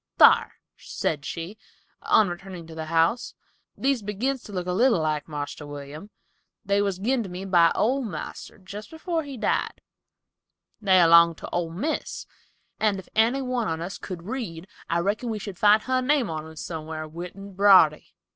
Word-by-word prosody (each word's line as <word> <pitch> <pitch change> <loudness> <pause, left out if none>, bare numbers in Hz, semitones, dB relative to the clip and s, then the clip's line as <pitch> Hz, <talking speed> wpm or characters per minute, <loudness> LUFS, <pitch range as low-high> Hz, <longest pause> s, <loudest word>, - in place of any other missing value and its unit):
"Thar," - - +6 0.2
said 145 -2 -3
she, 175 +6 -6 0.4
on 215 - +4
returning 175 -1 -7
to 165 - -11
the 160 0 -5
house, 165 +9 +1 0.4
"these 270 -3 +1
begins 230 +6 -2
to 210 - -12
look 180 -3 -3
a 180 - -2
little 230 -2 +3
like 155 -1 -1
Marster 145 -1 -6
William. 145 +6 -9 0.6
They 200 +1 +2
was 200 -2 -1
gin 240 +6 0
to 200 - -6
me 180 +2 -6
by 175 -3 +5
old 255 +2 +1
marster, 160 -7 -7
jest 200 +2 -10
afore 325 +1 -2
he 280 -4 -8
died. - - -1 1.0
They 190 -3 +5
'longed 170 0 +6
to - - -8
old 165 -1 -2
Miss, 300 - -3 0.5
and 210 -2 +2
if 190 - -10
any 235 +5 +2
one 250 -3 -1
on 160 0 -2
us 175 +3 -6
could 180 -3 -7
read, 195 -6 -5 0.2
I 170 - +1
reckon 210 +6 -1
we 220 - -2
should 200 -3 -7
find 210 +1 +5
her 255 0 +1
name 255 - +1
on 155 0 -5
'em 160 - -12
somewhar 155 0 -6
writ 170 +3 -8
in 200 0 -10
brawdery." 185 -6 +5
190 Hz, 180 wpm, -25 LUFS, 165-220 Hz, 1.0 s, Thar